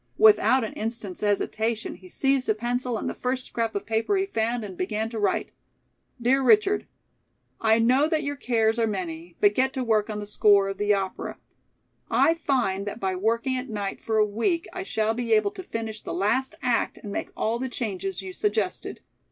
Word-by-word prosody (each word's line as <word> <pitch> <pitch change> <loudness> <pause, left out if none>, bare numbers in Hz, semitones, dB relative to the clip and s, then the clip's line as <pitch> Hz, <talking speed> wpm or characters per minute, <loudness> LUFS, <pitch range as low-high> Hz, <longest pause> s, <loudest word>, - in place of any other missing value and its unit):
Without 265 - +6
an 220 - -4
instant's 220 -4 -4
hesitation, 220 +2 -1
he 185 - -14
seized 270 +4 +1
a 215 - +3
pencil 245 +1 -1
and - - -4
the - - -2
first 255 0 -2
scrap 230 -2 -2
of 200 0 -2
paper 225 - +1
he 385 - +1
found 230 - -1
and 190 -3 -8
began 210 +5 -2
to 225 - -4
write: 205 - 0 0.7
"Dear 255 +3 +3
Richard: 410 +7 +4 0.7
"I 220 0 +4
know 255 +6 +4
that 315 -1 +1
your 285 0 -2
cares 230 -4 +1
are 225 - +2
many, 175 -4 -5
but 205 0 +5
get 265 +3 +1
to 260 - -2
work 220 -2 +1
on 210 - -3
the 210 - -5
score 205 -1 +4
of 195 - -5
the 205 0 +2
opera. 190 -1 -4 0.7
I 325 - +4
find 245 - 0
that 205 - -5
by 190 -2 -1
working 230 +7 0
at 255 0 -5
night 205 -2 -4
for 220 -1 -1
a 215 - +5
week 230 - -1
I 370 - -4
shall 220 - 0
be 230 -1 0
able 210 -2 +3
to - - -8
finish 225 -9 -5
the - - -5
last 220 +8 0
act 245 -2 +1
and 205 - -8
make - - -3
all 230 +2 0
the 260 +1 -3
changes 195 -6 -4
you 190 -1 -7
suggested. 210 -1 -2
225 Hz, 200 wpm, -26 LUFS, 205-255 Hz, 0.7 s, Without